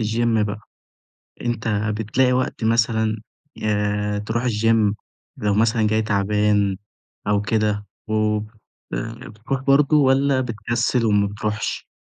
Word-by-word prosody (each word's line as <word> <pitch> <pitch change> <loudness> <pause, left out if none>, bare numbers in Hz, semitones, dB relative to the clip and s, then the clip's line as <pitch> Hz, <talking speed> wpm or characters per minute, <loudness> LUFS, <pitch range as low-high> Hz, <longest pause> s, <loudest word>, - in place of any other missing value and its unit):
الgym 115 0 +1
بقى، 105 +1 -5 0.8
أنتَ 120 -1 -2 0.3
بتلاقي 125 +4 +2
وقت 130 -2 -1
مثلًا، 110 -1 +2 0.5
آآ 105 -1 0
ترُوح 110 +3 -2
الgym 110 -2 +2 0.4
لو 105 -1 0
مثلًا 110 +1 +2
جاي 110 +1 +2
تعبان 105 -1 +1 0.5
أو 105 -1 +2
كده 105 -1 0 0.2
وبت 110 0 0 0.7
بتروح 115 +5 -4
برضه 140 +2 +4
والّا 135 -1 +3
بتكسل 120 0 -1
وما 105 -1 +3
بتروحش؟ 105 +1 -3
110 Hz, 110 wpm, -22 LUFS, 105-120 Hz, 0.8 s, برضه